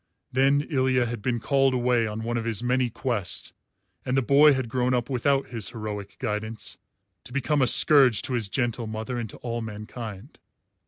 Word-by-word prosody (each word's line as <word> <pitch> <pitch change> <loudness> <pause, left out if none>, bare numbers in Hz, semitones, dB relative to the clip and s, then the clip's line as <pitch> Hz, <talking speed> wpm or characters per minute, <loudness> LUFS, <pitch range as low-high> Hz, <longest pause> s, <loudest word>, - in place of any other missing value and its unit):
Then 135 +2 +3
Ilya 130 -4 +1
had 115 -2 -5
been 120 +1 -1
called 135 +3 +2
away 120 -2 +1
on 110 +1 -5
one 120 +1 -2
of 115 - -1
his 115 0 -2
many 125 0 +1
quests, 115 -5 -2 0.5
and 130 +1 -1
the 135 - +2
boy 145 +4 +6
had 130 -3 -2
grown 125 +2 0
up 120 +2 -2
without 135 +2 +1
his 110 -5 -4
heroic 105 -3 -7
guidance 110 -2 -5 0.4
to 125 - -12
become 140 +2 0
a 130 - +3
scourge 130 -3 +6
to 130 - -3
his 115 -5 0
gentle 120 -1 -2
mother 110 +3 -4
and 115 -2 -5
to - - -11
all 120 0 -3
mankind. 110 +1 -8
120 Hz, 190 wpm, -25 LUFS, 110-130 Hz, 0.5 s, boy